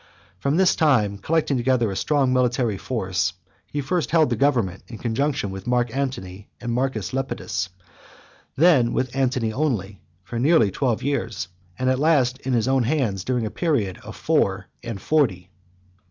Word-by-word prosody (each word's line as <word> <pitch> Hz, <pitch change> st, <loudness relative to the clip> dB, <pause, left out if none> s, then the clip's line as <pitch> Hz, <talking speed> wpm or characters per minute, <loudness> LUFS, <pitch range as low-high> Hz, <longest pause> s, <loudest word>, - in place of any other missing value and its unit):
From 140 Hz, -, +1 dB
this 190 Hz, -1 st, +4 dB
time, 110 Hz, -, +2 dB
collecting 155 Hz, +2 st, +1 dB
together 120 Hz, -3 st, +1 dB
a -, -, -4 dB
strong 135 Hz, +2 st, +1 dB
military 125 Hz, -5 st, +1 dB
force, 95 Hz, -6 st, -1 dB, 0.3 s
he 145 Hz, +7 st, -3 dB
first 165 Hz, +4 st, -1 dB
held 155 Hz, -5 st, +3 dB
the -, -, +2 dB
government 120 Hz, -9 st, +1 dB
in 115 Hz, -, -8 dB
conjunction 120 Hz, -2 st, -1 dB
with 95 Hz, +3 st, -8 dB
Mark 120 Hz, -1 st, +1 dB
Antony 105 Hz, -8 st, -4 dB
and 120 Hz, 0 st, -3 dB
Marcus 125 Hz, -6 st, -1 dB
Lepidus, 135 Hz, -7 st, -2 dB, 0.9 s
then 140 Hz, -7 st, +4 dB
with 130 Hz, 0 st, -1 dB
Antony 125 Hz, -4 st, 0 dB
only, 105 Hz, -, -2 dB, 0.2 s
for 115 Hz, +4 st, -5 dB
nearly 130 Hz, -, +4 dB
twelve 120 Hz, 0 st, -1 dB
years, 115 Hz, -9 st, -2 dB, 0.3 s
and 130 Hz, -, -1 dB
at 130 Hz, 0 st, +2 dB
last 135 Hz, -5 st, +3 dB
in 130 Hz, -, -2 dB
his 120 Hz, 0 st, +1 dB
own 135 Hz, 0 st, +3 dB
hands 120 Hz, -, 0 dB
during 125 Hz, -3 st, -1 dB
a 105 Hz, -, -4 dB
period 120 Hz, -, 0 dB
of -, -, -10 dB
four -, -, +1 dB, 0.2 s
and 115 Hz, -4 st, -5 dB
forty. 95 Hz, -, +1 dB
125 Hz, 165 wpm, -23 LUFS, 110-140 Hz, 0.9 s, this